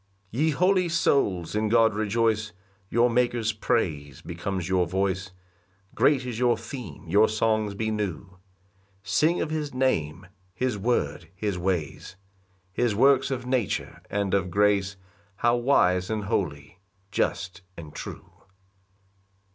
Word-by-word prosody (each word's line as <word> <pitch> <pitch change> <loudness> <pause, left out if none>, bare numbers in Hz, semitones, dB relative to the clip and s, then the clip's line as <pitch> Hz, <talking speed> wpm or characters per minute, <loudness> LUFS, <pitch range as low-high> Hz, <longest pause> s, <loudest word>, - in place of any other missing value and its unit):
1 125 - -2
Ye 160 - +3
holy 180 +3 +2
souls, 105 - +1
in 105 0 0
God 115 -1 +4
rejoice, 110 0 0 0.4
Your 120 +2 +4
Maker's 120 -2 +1
praise 75 - -2
becomes 90 +1 -4
your 90 -2 +2
voice; 95 +1 -1 0.6
Great 135 -3 +3
is 120 -3 -4
your 120 -2 +3
theme, 115 - -9
your 105 +6 +4
songs 110 -1 0
be 110 +1 -1
new: 100 -3 -4 0.7
Sing 150 - +2
of 155 - -2
his 150 -4 -3
name, 95 - 0 0.3
his 125 +2 -1
word, 100 -6 -1
his 100 -1 -2
ways, 90 -1 -3 0.6
His 120 0 +1
works 135 +3 +4
of 130 -2 -3
nature 125 -5 -2
and 100 -2 -1
of 95 -2 +1
grace, 100 +1 +2 0.4
How 120 +4 +2
wise 95 -8 +2
and 110 -2 -2
holy, 85 -4 -3 0.3
just 90 0 -2 0.2
and 75 -3 -9
true. - - -8
105 Hz, 130 wpm, -26 LUFS, 95-120 Hz, 0.7 s, God